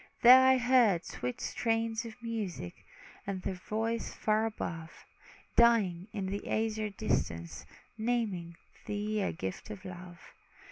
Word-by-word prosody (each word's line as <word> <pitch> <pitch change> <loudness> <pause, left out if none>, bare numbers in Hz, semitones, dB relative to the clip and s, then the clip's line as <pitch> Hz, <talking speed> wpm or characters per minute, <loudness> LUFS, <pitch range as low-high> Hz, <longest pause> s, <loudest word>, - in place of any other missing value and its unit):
There 255 +2 +10
I 260 0 +6
heard 235 -8 +4
sweet 125 0 -5
strains 225 0 -1
of 230 +1 -10
music, 210 - -4 0.5
And 190 -2 -3
their 195 - -2
voices 220 +5 -3
far 215 +1 +1
above, 165 -7 -5 0.6
Dying 210 -7 +4
in 200 -3 -3
the 200 +2 -4
azure 220 -1 0
distance, 85 - -2 0.3
Naming 215 -8 -1 0.3
thee 210 +1 -1
a - - 0
gift 95 - -6
of 200 -2 -8
love. 180 -1 -9
215 Hz, 130 wpm, -31 LUFS, 180-230 Hz, 0.6 s, There